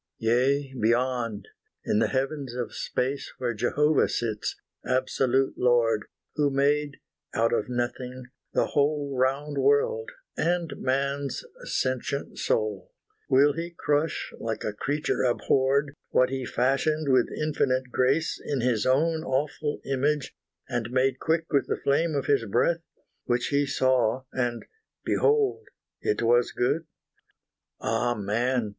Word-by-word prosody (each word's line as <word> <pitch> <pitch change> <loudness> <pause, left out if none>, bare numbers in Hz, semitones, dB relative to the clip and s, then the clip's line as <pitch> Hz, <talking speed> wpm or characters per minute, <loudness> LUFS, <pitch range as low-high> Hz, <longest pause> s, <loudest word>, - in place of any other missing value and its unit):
Yea, 130 +4 +1
beyond 120 -2 0 0.4
in 105 - +2
the - - +3
heavens 135 -1 -2
of 125 -1 -4
space 135 +3 -2
Where 120 -2 -1
Jehovah 145 +7 +2
sits, 110 -3 -2 0.2
absolute 130 +1 +1
Lord, 115 -3 +3 0.3
Who 145 -1 +3
made 145 +1 +1 0.4
out 115 +1 +2
of 120 - 0
nothing 125 +1 -3 0.3
the - - +2
whole 145 -1 0
Round 135 +3 0
world, 460 +2 +2 0.3
and 170 -1 0
man's 140 +1 -1 0.2
sentient 130 - -2
soul 105 -3 -1 0.4
Will 140 +2 +5
He 170 +2 -5
crush, 150 +2 0
like 115 -1 -3
a 105 - -2
creature 145 +8 -1
abhorred, 135 +3 +2 0.2
What 130 0 +3
He 135 -1 -2
fashioned 140 +4 +1
with 125 -2 +4
infinite 130 -4 0
grace 135 +6 +1
In 140 -4 -1
His 115 -3 +1
own 160 +5 +2
awful 145 +1 -2
image, 140 +1 0 0.3
and 120 -3 -2
made 130 +1 +1
Quick 165 0 +1
with 140 -2 +2
the - - -1
flame 155 +3 +1
of 140 - -1
His 140 -4 +2
breath, 145 +11 +1 0.4
Which 120 0 0
He 145 0 +2
saw 130 -2 +2
and 120 -2 -2 0.4
behold 435 0 +2 0.3
it 105 - 0
was 120 +1 +3
good? 160 +6 0 0.9
Ah 120 +2 0
man! 115 +3 0
130 Hz, 130 wpm, -27 LUFS, 120-145 Hz, 0.9 s, Will